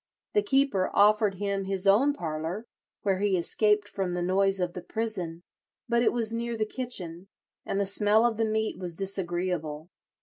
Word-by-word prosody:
The 420 - +4
keeper 270 - +2
offered 210 0 +4
him 200 0 -2
his 195 0 -1
own 230 +9 +5
parlour, 165 - -4 0.4
where 195 -2 +1
he 200 -2 +2
escaped 210 +4 +2
from 185 -3 -3
the 175 - -1
noise 195 +2 +2
of 180 -1 -1
the 180 - -6
prison; 185 -8 -4 0.4
but 235 0 +2
it 240 - +3
was 230 -2 -1
near 235 0 -2
the 215 - 0
kitchen, 195 -8 -4 0.4
and 195 - -1
the 200 - +1
smell 210 +3 +3
of 235 -2 +1
the 225 - +1
meat 220 0 -1
was 175 -3 -5
disagreeable. 175 -4 -1
195 Hz, 175 wpm, -28 LUFS, 180-220 Hz, 0.4 s, own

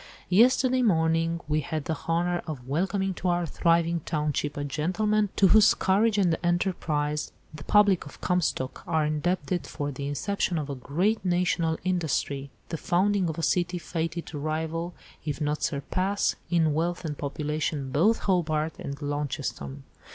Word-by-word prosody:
"Yesterday 255 +6 +4
morning 165 -5 +2
we 150 0 +1
had 155 -1 -4
the 160 - -1
honour 175 +1 +1
of 135 -6 -6
welcoming 190 +6 0
to 180 - -4
our 175 0 +1
thriving 170 +1 +2
township 150 -2 -2
a 145 - -2
gentleman, 195 +9 0
to 195 - +5
whose 215 +1 +6
courage 210 +3 +2
and 180 -5 +3
enterprise 155 -4 0 0.2
the 150 -1 -9
public 205 -6 +4
of - - -13
Comstock 175 -7 -1
are 160 -2 +2
indebted 175 +4 -1
for 145 -2 -4
the 140 +1 -5
inception 175 +5 -1
of 150 -2 -3
a - - -2
great 175 - 0
national 175 -3 +1
industry, 155 -6 -1 0.2
the 165 - -3
founding 185 +2 +1
of 160 - -4
a 165 - -3
city 180 +3 +1
fated 165 0 -3
to 150 - -7
rival, 160 +3 -3 0.3
if 150 -1 -3
not 150 0 -1
surpass, 185 +8 0
in 160 -3 +3
wealth 170 +3 -1
and 150 -2 -4
population 150 -1 -2
both 195 - +3
Hobart 160 -4 0
and 140 0 -5
Launceston. 135 - -3
165 Hz, 155 wpm, -27 LUFS, 150-180 Hz, 0.3 s, whose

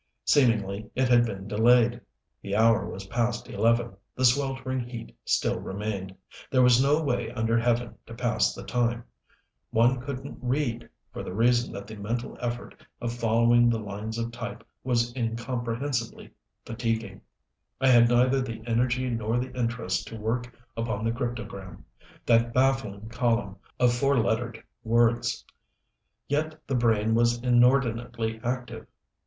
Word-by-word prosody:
Seemingly 110 -6 +2
it 130 -1 +1
had 120 -1 +5
been 100 -3 -6
delayed. 115 +3 +3 0.4
The 100 0 -3
hour 115 0 +3
was 95 +1 -7
past 120 +3 -1
eleven, 115 -2 +1 0.2
the 130 - +1
sweltering 130 0 +1
heat 120 -1 -7
still - - +1
remained. 95 -1 -5 0.3
There 130 -1 +4
was 125 0 +6
no 145 +3 +3
way 125 -5 -1
under 115 0 0
Heaven 120 0 0
to 115 - -9
pass 115 - +1
the - - -8
time. 120 -1 0 0.7
One 120 +3 +3
couldn't 135 0 -6
read, 125 -2 -1 0.2
for - - -5
the 90 - -6
reason 120 +2 +2
that 100 0 -7
the 110 0 -10
mental 115 +4 -4
effort 120 0 -5 0.2
of 120 -1 -3
following 120 +1 +3
the 115 - +1
lines 105 +1 -5
of 115 0 -3
type 120 0 -7 0.2
was 120 -1 0
incomprehensibly 120 +1 -3 0.3
fatiguing. 115 -1 -3 0.6
I 135 0 +3
had 120 -2 +6
neither 125 +2 +3
the 115 -3 -6
energy 120 +2 +1
nor 115 -1 -1
the 125 +1 -3
interest 115 -5 -2
to 115 - -8
work 120 +3 -2 0.2
upon 115 -1 -2
the 115 - +2
cryptogram 115 -7 -6 0.4
that 115 0 +3
baffling 130 -6 +1
column 115 -4 0 0.2
of 125 -1 +4
four 140 +2 +2
lettered 115 0 -1 0.2
words. 115 +1 +1 0.8
Yet 155 +2 -1
the 135 - -3
brain 110 -3 +2
was 120 +1 +3
inordinately 120 -2 +2
active. 120 -2 -4
120 Hz, 145 wpm, -27 LUFS, 115-125 Hz, 0.8 s, was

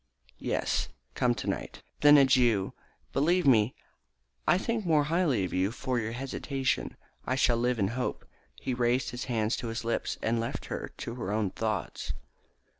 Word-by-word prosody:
"Yes, - - 0 0.3
come 120 -1 +2
tonight." - - -4 0.2
"Then, 145 0 +8
adieu. 125 -7 +4 0.4
Believe 170 +6 +3
me 115 -3 +4 0.7
that - - +6
I - - +3
think 230 +3 -1
more 155 -4 +3
highly 150 - +1
of 90 - -3
you 95 +2 +2
for 125 0 -1
your 110 0 -3
hesitation. 135 +1 -2 0.3
I 130 - +1
shall 120 -3 +3
live 125 +1 +1
in 100 -3 +1
hope." 125 +2 -3 0.3
He 130 - -3
raised 120 +1 +1
her 125 +1 -5
hand 110 -3 0
to 120 - -4
his 115 +1 -3
lips, 115 - -1
and 115 +1 +1
left 115 +1 -3
her - - -5
to 115 - -5
her 115 -5 -4
own 105 -3 0
thoughts. 110 -4 -3
125 Hz, 170 wpm, -29 LUFS, 115-135 Hz, 0.7 s, Then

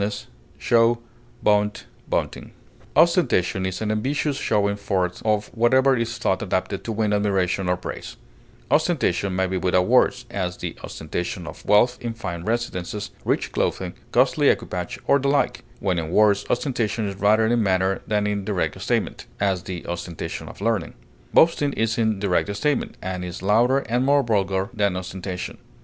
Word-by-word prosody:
display, 115 +3 0 0.5
pageantry, 105 0 +2 0.3
pomposity, - - -2 0.4
Ostentation 160 - +3
is 95 +3 -4
an 105 - 0
ambitious 140 +7 0
showing 100 -6 +1
forth 95 -3 -1
of 105 -1 +1
whatever 130 +3 +4
is 115 -1 -2
thought 95 -5 0
adapted 95 -1 -2
to 115 - -4
win 105 -1 0
admiration 95 -3 +1
or 90 - +2
praise; - - -7 0.5
ostentation 115 - +1
may 95 0 +2
be 95 0 -2
without 90 0 +2
words; 125 +1 +3
as, 90 -2 -2
the - - -5
ostentation 85 +2 -4
of - - -9
wealth 120 +5 +4
in 115 -1 -4
fine 85 -7 -5
residences, 105 -3 -3
rich - - 0
clothing, - - -1 0.2
costly - - +4
equipage, 90 -2 -2
or 140 - +4
the 140 - -1
like; 140 +1 +1 0.2
when 90 -3 0
in 80 -1 -4
words, 105 +2 +3
ostentation 120 -4 0
is 100 - -4
rather 105 +2 +4
in 120 +1 +2
manner 95 -1 +1
than 105 -1 +1
in 105 -1 -1
direct 95 -2 -2
statement; - - -1
as, 95 -3 +1
the 90 -1 -6
ostentation 85 -1 -5
of - - -12
learning. 105 -6 -1 0.4
Boasting 150 -3 +4
is 115 +1 0
in 110 -2 +2
direct 100 0 +1
statement, 145 +6 -1
and 90 0 -3
is 90 0 -6
louder 115 +7 +4
and 125 +2 +1
more 140 +1 +4
vulgar 100 -3 0
than 100 -4 +1
ostentation. 90 0 -5
105 Hz, 160 wpm, -23 LUFS, 95-115 Hz, 0.5 s, whatever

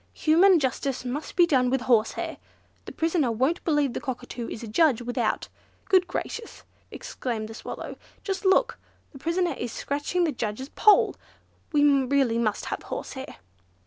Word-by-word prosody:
Human 350 +4 +5
justice 265 -1 -2
must 280 +5 -4
be 350 - +6
done 255 -6 +2
with 265 0 0
horsehair. 235 -3 +1 0.5
The - - -7
prisoner 320 -6 +1
won't 260 +9 0
believe 295 -5 +1
the - - -4
Cockatoo 250 -3 -5
is 225 - -7
a - - -6
judge 245 +1 +3
without. 245 0 -1 0.4
Good 370 -2 +4
Gracious!" 460 0 -5 0.3
exclaimed 225 -4 -5
the - - -8
Swallow, - - -7 0.3
"just 390 0 -3
look! 455 +5 +3 0.3
The 275 - -12
prisoner 340 +4 0
is 240 -1 -5
scratching 290 +8 -1
the 325 - +1
judge's 235 +2 -4
poll! 420 +5 +4 0.6
We 295 -2 +3
really 270 -4 +3
must 215 -3 -1
have - - -4
horsehair!" 265 0 -7
275 Hz, 155 wpm, -26 LUFS, 245-335 Hz, 0.6 s, be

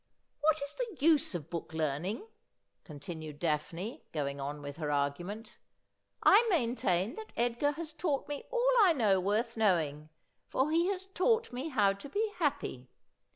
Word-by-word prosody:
' - - -48
What 315 +1 +3
is 280 - -5
the 475 -6 -4
use 300 - +4
of 165 -2 -6
book 165 -2 -5
learning 160 - -1 0.3
?' - - -50
continued 155 -1 -8
Daphne, 165 +6 -2
going 140 -2 -3
on 145 +1 -5
with 145 +1 -7
her 155 -3 -3
argument. 150 +10 -2 0.3
' - - -51 0.3
I 410 +4 +7
maintain 230 - +1
that 440 -1 -8
Edgar 240 +5 +1
has 315 0 -6
taught 300 -3 -1
me 290 -1 -5
all - - +1
I 375 -5 +6
know 210 -9 +3
worth 215 +5 0
knowing, 160 -8 +1 0.4
for 270 +4 +1
he 335 +2 +3
has 380 -1 -2
taught 445 - +1
me 260 +6 -3
how 205 -8 +3
to 200 +8 -10
be 425 +7 0
happy. 130 - -2
225 Hz, 170 wpm, -32 LUFS, -, 0.4 s, I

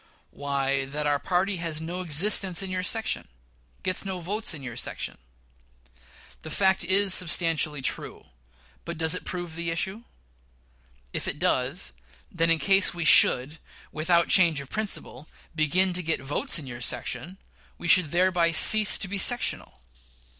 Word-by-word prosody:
Why, 140 -1 -3
that 150 +2 -5
our 145 -1 0
party 185 +4 -1
has 165 -2 -2
no 170 +3 -6
existence 185 +3 +3
in 190 - -5
your 185 0 -3
section 220 +4 -3 0.6
gets 185 -1 +1
no 190 -2 -5
votes 205 +6 -3
in 140 - -11
your 120 -3 -8
section. 65 +1 -5 1.2
The 155 - -9
fact 190 +3 +1
is 190 +2 +2
substantially 160 -5 +1
true; - - -3 0.6
but - - -7
does 160 0 +1
it 180 - -4
prove 175 -3 -6
the 170 0 -4
issue? 190 +6 -3 1.1
If - - -4
it - - -4
does, 150 -1 0 0.4
then 165 0 -1
in 165 - +3
case 195 +2 +3
we 170 -2 -4
should, 145 +1 +4 0.3
without 170 +2 +1
change 170 -6 +4
of 140 -1 -9
principle, 205 -8 -4 0.3
begin 175 +4 0
to 180 - -2
get 165 -2 -2
votes 135 +2 -2
in 155 - -8
your 120 -1 -9
section, 125 +8 -4 0.4
we - - -7
should 180 +1 +6
thereby 175 0 +1
cease 215 +6 +7
to - - -1
be 200 +1 -4
sectional. 245 - 0
170 Hz, 155 wpm, -25 LUFS, 150-185 Hz, 1.2 s, cease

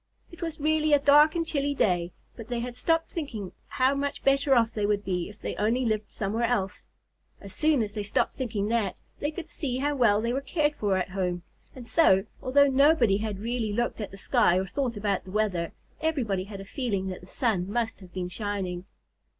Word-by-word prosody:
It 340 0 -13
was 330 -3 -4
really 310 0 +2
a 290 - +7
dark 295 +3 +6
and 335 -1 0
chilly 285 -3 -1
day, 175 -7 +1 0.2
but 225 -2 -9
they 240 -1 -2
had 240 +1 -5
stopped 330 +6 0
thinking 230 - -5 0.2
how 260 -1 +2
much 280 0 -3
better 275 0 +4
off 230 -2 +3
they 210 -2 0
would 205 -1 0
be 180 -2 -2
if 210 - -14
they - - -4
only 230 +5 +1
lived 215 -2 -1
somewhere 220 +4 -1
else. 205 -5 -2 0.5
As 200 -1 -9
soon 305 -6 +2
as 205 -1 -5
they 210 - -3
stopped 205 0 0
thinking 215 -6 -2
that, 225 -5 0 0.2
they 290 - -1
could 320 +1 -7
see 260 -5 -3
how 290 +2 0
well 225 -6 +4
they 235 +2 -1
were 270 - -1
cared 295 +2 0
for 205 -8 0
at 185 - -2
home. 180 -2 -2 0.3
And 250 -2 -9
so, 195 - +4 0.2
although 280 +2 +5
nobody 275 -6 +4
had 210 -1 -3
really 230 -2 -2
looked 235 0 -1
at 205 - -4
the 195 - -11
sky 180 -2 +3
or 190 - 0
thought 245 +2 -2
about 200 -2 -1
the 190 - -12
weather, 185 -5 0 0.3
everybody 235 -13 0
had 200 -1 -8
a - - -9
feeling 200 -6 -2
that 185 - -6
the 180 - -14
sun 200 -5 0
must 230 0 -1
have 185 -3 -14
been 180 0 -3
shining. 185 -2 -3
225 Hz, 215 wpm, -27 LUFS, 195-280 Hz, 0.5 s, a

